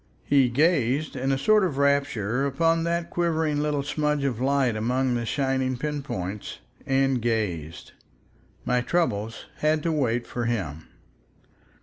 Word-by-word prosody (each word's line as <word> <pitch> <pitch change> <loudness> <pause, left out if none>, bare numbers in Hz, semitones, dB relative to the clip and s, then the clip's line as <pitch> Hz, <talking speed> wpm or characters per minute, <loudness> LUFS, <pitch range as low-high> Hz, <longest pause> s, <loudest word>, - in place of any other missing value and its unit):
He 135 -3 +3
gazed 145 0 +1
in 135 +1 -1
a 135 - +2
sort 210 +9 +4
of 165 -8 -1
rapture 140 -3 +1
upon 165 +4 +1
that 170 0 -1
quivering 160 -3 0
little 150 -2 0
smudge 150 0 -1
of 125 -4 -1
light 135 -3 +2
among 125 +4 0
the 120 -1 -2
shining 130 -1 0
pin 150 +2 -3
points—and 130 +4 -2
gazed. 100 -9 -2 0.7
My 125 0 +2
troubles 115 -8 -1
had 155 0 +1
to 165 - +1
wait 120 -6 0
for 120 -1 -4
him. 85 -10 -3
135 Hz, 135 wpm, -25 LUFS, 120-150 Hz, 0.7 s, sort